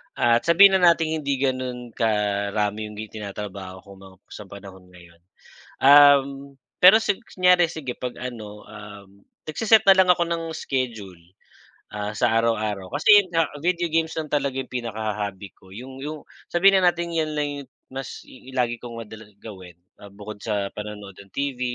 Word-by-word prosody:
at 120 +3 +2
sabihin 195 +4 +7
na 170 -1 +6
nating 160 -1 -2
hindi 140 -2 -1
ganun 130 -2 -3
karami 105 -1 -1
yung 105 - -11
gi 110 +1 -8
tinatrabaho 100 -3 -8
ko 100 - -19
mga 95 -1 -15 0.2
sa 105 - -10
panahon 95 -2 -13
ngayon. 85 -2 -18 0.6
Um, 140 0 +7 0.5
pero 195 +5 +7
si 205 -3 0
kunyari 180 -5 +2
sige 155 -6 -7
'pag, 125 -1 -5
ano, 110 -4 -8
um, 105 -2 -13 0.2
nagse-set 220 +6 +3
na 190 - +7
lang 190 -1 +5
ako 175 - -5
ng 165 -1 -2
schedule, 115 - -4 0.7
ah, 105 0 -5
sa 110 - +1
araw-araw, 105 -4 -2
kasi 205 +7 +6
yung 185 - -15
nga, 165 -1 +1 0.2
video 170 0 -1
games 165 0 0
lang 155 -2 -5
talaga 140 -2 -1
yung 135 -1 -5
pinaka-ho 110 -3 -4
hobby 100 -1 -6
ko 95 - -22
yung 130 +7 -10
yung 150 +2 -7 0.2
sabihin 190 +2 +4
na 180 - +5
natin 170 0 -6
yan 160 -2 -1
lang 145 -1 -1
yung 135 - -13 0.2
mas 135 -1 -7
i 130 0 -15
lagi 120 -2 -1
kong 115 -1 -9
madalas 105 0 -13
gawin, 95 -6 -12 0.2
ah, 100 - -12
bukod 105 +1 -10
sa 100 -3 -3
panonood 105 -2 -8
ng 100 -1 -16
TV, 140 -2 -4
120 Hz, 175 wpm, -23 LUFS, 105-155 Hz, 0.7 s, sabihin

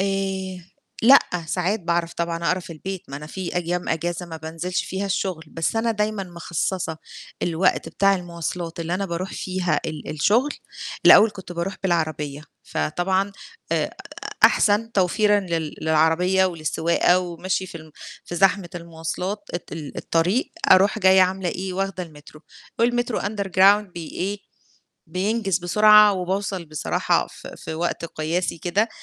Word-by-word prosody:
آآ 190 -1 -2 0.4
لأ، 265 +5 +9 0.3
ساعات 185 +6 0
باعرف 170 -1 -1
طبعًا 170 0 -2
أقرا 185 +1 +1
في 170 - -9
البيت، 190 +3 -6
ما 140 - -6
أنا 150 +1 -8
في 180 +2 -5
أيام 175 0 -1
اجازة 175 +2 -2
ما 165 -1 -7
بانزلش 165 +3 -3
فيها 195 +2 -3
الشغل 185 -4 -2
بس 165 +8 -2
أنا 230 +1 +1
دايمًا 210 -1 -1
مخصصة 170 -1 -3 0.5
الوقت 175 +2 +1
بتاع 195 0 +3
المواصلات 170 -1 -5
اللي 165 +1 -2
أنا 195 +1 -2
باروح 175 +2 -4
فيها 180 -5 -1
ال 155 -2 -6
الشغل 215 - +2 0.6
الأول 215 +1 +9
كنت 190 -3 -9
باروح 175 +3 -3
بالعربية، 155 -5 -1 0.2
فطبعًا 185 - -1 0.4
آآ - - 0 0.5
أحسن 220 +2 +4
توفيرًا 205 +2 +3
لل 165 -5 -3
للعربية 160 +4 +3
وللسواقة 170 +1 +2
ومشي 185 +1 -2
في - - -12
ال 155 -1 -14 0.3
في 175 - -7
زحمة 190 -1 +3
المواصلات 170 +4 -5
الت 175 - -6
ال 155 -3 -7
الطريق 180 +10 0 0.2
أروح 195 +3 +6
جاية 190 -1 +6
عاملة 185 0 0
إيه؟ 185 +2 -4
واخدة 195 0 -2
المترو، 155 -2 -13 0.4
والمترو 240 0 +1
Underground 200 -1 +3
بي 170 -2 -6
إيه؟ 200 +3 -3 0.7
بينجز 195 0 0
بسرعة 210 +3 +6
وباوصل 190 0 -2
بصراحة 155 -1 0
في - - -11
في - - -6
وقت 170 +1 -2
قياسي 165 +2 -2
كده 190 +7 +1
180 Hz, 145 wpm, -23 LUFS, 165-195 Hz, 0.7 s, لأ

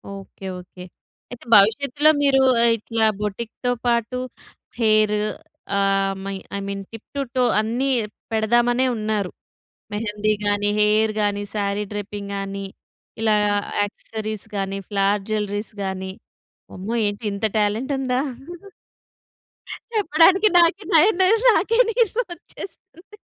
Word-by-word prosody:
Okay. 195 0 -11
Okay. 180 0 -12 0.5
అయితే 245 -1 -10
భవిష్యత్తులో 280 +9 +4
మీరు 270 -1 +4 0.3
ఇట్లా 225 0 -1
బోటిక్‌తో 220 +4 -3 0.2
పాటు 235 +1 0 0.6
హెయిర్ 215 -2 +3 0.6
ఆహ్, 195 0 +2
my 195 0 -3 0.2
I - - -3
mean 200 0 -4
tip 225 -1 -11
to 280 - 0
toe 255 - +3 0.2
అన్నీ 235 +5 0 0.4
పెడదామనే 240 +3 +2
ఉన్నారు. 215 -3 -2 0.6
మెహందీ 210 0 -1
గాని, 205 0 +1
హెయిర్ 215 +1 +3
గాని, 205 0 0
సారీ 200 0 -1
డ్రేపింగ్ 205 -1 -6
గాని, 195 0 -4 0.6
ఇలా 220 -1 +3 0.5
యాక్సెసరీస్ 215 +1 -4
గాని, 195 0 -2
ఫ్లవర్ 200 0 +1
జ్యువెల్లరీస్ 210 0 -2
గాని 190 0 -4 0.6
అమ్మో! 195 +5 -5
ఏంటి 205 +3 -4
ఇంత 200 +2 -2
టాలెంట్ 215 +6 0
ఉందా? 255 -1 0 1.8
చెప్పడానికి 380 +2 +5
నాకే 345 +4 +3
నయనర, 375 +4 +5 0.2
నాకే 425 +7 +1
నీరసం 465 +1 +1
వచ్చేస్తుంది. 375 +3 -12
215 Hz, 110 wpm, -22 LUFS, 205-260 Hz, 1.8 s, చెప్పడానికి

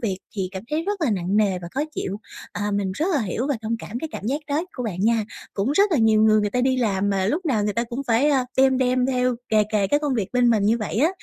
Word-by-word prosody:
việc 195 -5 -2 0.2
thì 185 -2 -1
cảm 190 +1 -6
thấy 310 +2 0
rất 405 +1 -3
là 295 -8 +1
nặng 190 0 -1
nề 200 -4 +2
và 170 -1 -8
khó 275 - -3
chịu. 195 +1 -3 0.4
À, 205 0 -2
mình 200 -2 -1
rất 315 - -1
là 280 - +2
hiểu 220 +7 -2
và 285 -4 0
thông 225 +1 -1
cảm 235 +2 -6
cái 320 - -5
cảm 205 - -6
giác 285 +5 -1
đó 295 +3 0
của 250 - -5
bạn 190 -6 -4
nha. 225 +1 +2 0.3
Cũng 205 +8 0
rất 400 +4 +3
là 295 - +3
nhiều 220 -1 +4
người 215 -1 +5
người 205 - -1
ta 250 - 0
đi 260 0 +2
làm 205 -4 0
mà 190 -1 0
lúc 330 - -1
nào 220 -7 +1
người 210 - 0
ta 235 +2 -1
cũng 245 +4 -5
phải, 240 +6 +3
à, 265 -3 +2
đem 265 0 +4
đem 255 0 +2
theo 250 -1 +1
kề 215 -1 +4
kề 200 -2 +2
cái 290 +6 +1
công 290 -3 -1
việc 205 -5 -1
bên 245 -1 +3
mình 215 -3 +2
như 225 +3 +3
vậy 215 - -4
á, 300 +7 +4
230 Hz, 300 wpm, -23 LUFS, 205-265 Hz, 0.4 s, người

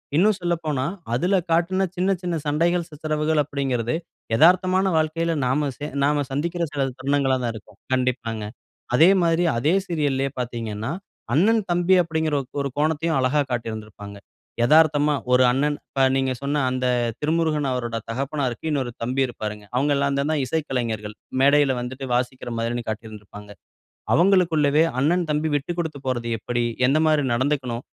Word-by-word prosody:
இன்னும் 205 +6 +4
சொல்லப்போனா, 160 -6 -1 0.3
அதில 180 +11 +1 0.2
காட்ன 185 +3 +2
சின்ன, 185 +1 0
சின்ன 175 -2 -2
சண்டைகள் 170 +3 +1
சித்தரவுகள் 155 0 -1
அப்பிடிங்கிறது 135 -3 -2 0.4
எதார்த்தமான 185 +6 +4
வாழ்க்கையில 165 +2 0
நாம 140 +3 +1
சே 145 - -5 0.2
நாம 145 0 +2
சந்திக்கிற 170 +5 -2
சில 140 -2 0 0.2
தருணங்களா 135 -1 +1
தான் 120 - -1
இருக்கும். 105 -1 -13 0.2
கண்டிப்பாங்க. 120 -4 -1 0.5
அதே 160 +7 +7
மாதிரி 170 0 +2
அதே 150 +8 +2
சீரியல்‌லேயே 140 -6 -1
பார்த்தீங்கன்னா, 115 -2 -4 0.4
அண்ணன் 215 - +3
தம்பி 175 +2 +3
அப்பிடிங்கற 160 -2 -1 0.3
ஒரு 140 - -2
கோணத்தையும் 160 0 +1
அழகா 135 +3 +2
காட்டியிருந்திருப்பாங்க. 110 -3 -5 0.5
எதார்த்தமா 150 0 +4 0.2
ஒரு 125 0 +6
அண்ணன் 145 +3 0
இப்ப 135 - -2
நீங்க 135 -1 +1
சொன்ன 145 +1 0
அந்த 130 0 -2 0.3
திருமுருகன் 155 -2 0
அவரோட 120 -2 -2
தகப்பனார்க்கு 135 +2 -2
இன்னொரு 130 -5 -1
தம்பி 130 +3 -1
இருப்பாருங்க. 105 -3 -6
அவுங்க 145 +3 +2
எல்லாந்தான 140 +2 0
இசைக்கலைஞர்கள். 120 -8 -3 0.3
மேடையில 140 -1 +4
வந்துட்டு 130 +2 -6
வாசிக்கிறமாரின்னு 120 -1 -2
காட்டியிருந்திருப்பாங்க. 105 -2 -8 0.6
அவுங்களுக்குள்ளவே 165 -5 +4 0.2
அண்ணன், 170 +7 +2
தம்பி 150 +1 0
விட்டு 145 +4 -1
குடுத்து 160 -4 -3
போறது 120 -2 -2
எப்பிடி? 120 +2 -2 0.2
எந்தமாரி 155 +2 +3
நடந்துக்கணும்? 130 -2 -1
140 Hz, 130 wpm, -23 LUFS, 125-160 Hz, 0.6 s, அதே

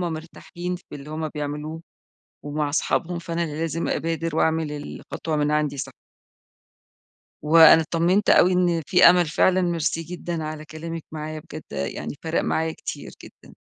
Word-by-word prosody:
مرتاحين 175 +1 -5
في 180 - -18
اللي 145 +1 -9
همّ 155 0 -3
بيعملوه، 150 +2 -5 0.6
ومع 145 0 -1
أصحابهم، 170 +3 0
فأنا 170 0 -3
اللي 150 -2 -5
لازم 165 0 -2
أبادر 165 -1 -2
وأعمل 160 -2 +1
الخطوة 150 +2 -5
من 150 0 +1
عندي 150 -2 0
صح. - - -4 1.5
وأنا 160 +1 +8
اطمنت 175 +6 +1
أوي 180 - +6
إن 175 -2 +2
في 180 - +4
أمل، 175 -1 +3
فعلًا 185 +4 +3
ميرسي 165 -1 0
جدًا 170 0 -5
على 155 0 -6
كلامِك 165 +1 -7
معايا، 155 0 -5
بجد - - -9
يعني 70 - -4
فارق 160 0 0
معايا 160 0 0
كتير - - -7
جدًا. - - -15
160 Hz, 150 wpm, -24 LUFS, 150-170 Hz, 1.5 s, وأنا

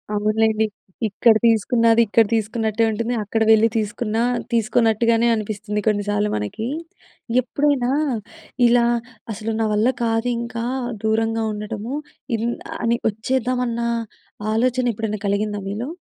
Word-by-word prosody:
అవునులెండి. 215 +1 +2 0.4
ఇక్కడ 220 +3 +4
తీసుకున్నది 230 +1 +4
ఇక్కడ 225 +2 +4
తీసుకున్నట్టే 220 0 0
ఉంటుంది. 230 +3 -2
అక్కడ 225 +2 -2
వెళ్ళి 220 +1 +6
తీసుకున్నా 220 +1 -1 0.3
తీసుకోన్నట్టుగానే 230 0 +2
అనిపిస్తుంది 210 -1 -3
కొన్ని 205 -1 +2
సార్లు 205 0 +1
మనకి. 105 - -3 0.7
ఎప్పుడైనా 260 0 +1 0.8
ఇలా 235 0 +4 0.5
అసలు 220 +2 -4
నా 225 - +2
వల్ల 215 +3 +2 0.2
కాదు 225 +1 0
ఇంకా 235 -1 -4 0.4
దూరంగా 225 +1 +1
ఉండటము. 210 +3 -5 0.4
ఇన్ 230 - -2 0.4
అని 235 +1 +2
వచ్చేద్దామన్న 245 +2 -1 0.7
ఆలోచన 245 +2 +1
ఎప్పుడైనా 215 -1 -3
కలిగిందా 205 0 -1
మీలో? 220 +7 -4
225 Hz, 110 wpm, -21 LUFS, 215-235 Hz, 0.8 s, వెళ్ళి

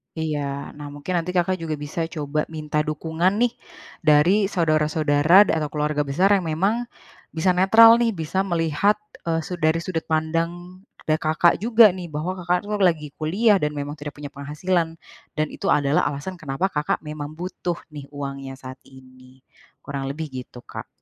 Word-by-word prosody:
Iya. 145 -3 -3
Nah, 145 -1 -7
mungkin 145 +5 -7
nanti 180 +2 -5
Kakak 180 +1 +1
juga 160 -2 -3
bisa 150 +3 -4
coba 150 -1 -3
minta 155 -1 -3
dukungan 160 +5 0
nih, 240 +2 +2 0.5
dari 170 +7 +4
saudara-saudara 155 +1 +4
atau 160 -6 -1
keluarga 150 -1 -1
besar 180 +9 +2
yang 190 -5 +2
memang 200 +10 0 0.5
bisa 170 +3 +2
netral 225 +6 +7
nih, 230 -3 +1
bisa 165 +3 -2
melihat, 170 +4 +2 0.3
eee, 165 -1 0
su 180 +1 -6
dari 160 +1 +1
sudut 165 -3 -4
pandang, 165 +3 -2 0.2
da 155 0 +1
Kakak 160 +2 +2
juga 225 -1 +6
nih, 180 -1 -7
bahwa 155 +4 -3
Kakak 180 +1 0
itu 205 - -7
lagi 165 -6 +2
kuliah, 195 +6 +3
dan 150 0 -2
memang 145 +1 -5
tidak 145 0 -7
punya 145 -1 -8
penghasilan, 160 +4 -2 0.4
dan 155 0 0
itu - - -5
adalah 145 +1 +2
alasan 160 +6 -5
kenapa 160 +6 -2
Kakak 150 +1 -1
memang 150 0 -7
butuh 175 0 -4 0.2
nih, 145 -2 -9
uangnya, 140 -1 -6
saat 130 0 -10
ini. 130 0 -18 0.4
Kurang 140 -1 -4
lebih, 150 +1 -5
gitu 125 -1 -9
Kak. - - -8
160 Hz, 165 wpm, -23 LUFS, 145-180 Hz, 0.5 s, netral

